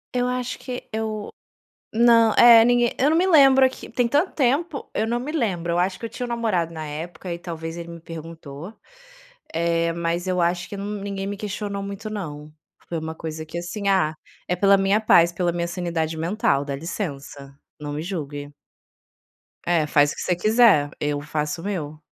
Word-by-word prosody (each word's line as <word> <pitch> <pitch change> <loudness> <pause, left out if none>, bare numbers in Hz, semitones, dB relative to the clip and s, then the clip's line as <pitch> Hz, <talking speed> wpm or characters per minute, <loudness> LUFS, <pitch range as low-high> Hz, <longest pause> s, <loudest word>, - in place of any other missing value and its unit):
Eu 250 0 +1
acho 250 0 -3
que 250 -1 -6
eu 215 -1 -4 0.6
não, 230 -1 +5
é 235 -1 +9
ninguém 240 0 +3
eu 275 +3 +3
não 320 - +3
me 365 - +3
lembro 270 -6 +6
que 260 - -11
tem 240 +1 +1
tanto 295 +9 +1
tempo, 280 +3 0
eu 220 - 0
não 240 +1 -1
me 270 +5 -5
lembro. 190 - -1
Eu 170 - +1
acho 185 +1 0
que 230 - -5
eu - - -6
tinha 235 +2 -6
um - - -4
namorado 215 -9 -1
na 155 -1 -6
época 170 +4 -6
e 170 - -4
talvez 165 -1 -6
ele 170 0 -7
me 170 0 -9
perguntou, 165 0 -9 0.8
eh, 170 0 +1
mas 170 +1 -2
eu 180 -1 0
acho 175 +1 0
que - - -6
n 205 +1 -4
ninguém 195 -1 -4
me 205 +1 -4
questionou 205 -1 -4
muito 200 +2 -6
não, 155 -8 -6 0.4
foi 170 - -3
uma 160 0 -5
coisa 160 -1 -6
que, 160 +2 -6
assim" 200 +4 -4
"Ah, 185 -6 +2 0.3
é 180 - 0
pela 200 +2 +5
minha 195 +2 +2
paz, 170 -5 +5
pela 175 0 0
minha 170 0 -2
sanidade 170 -3 -2
mental, 165 -4 +1
dá 140 -1 -4
licença, 140 -4 -6 0.3
não 145 -1 -5
me 150 - -3
julgue". 145 -5 -5 1.1
É, 170 -3 +2
"Faz 145 -1 +3
o - - -7
que - - -6
você 180 - 0
quiser, 215 -6 +4
eu 145 -1 -1
faço 150 +2 -3
o - - -11
meu". 155 -7 -4
180 Hz, 200 wpm, -23 LUFS, 160-220 Hz, 1.1 s, é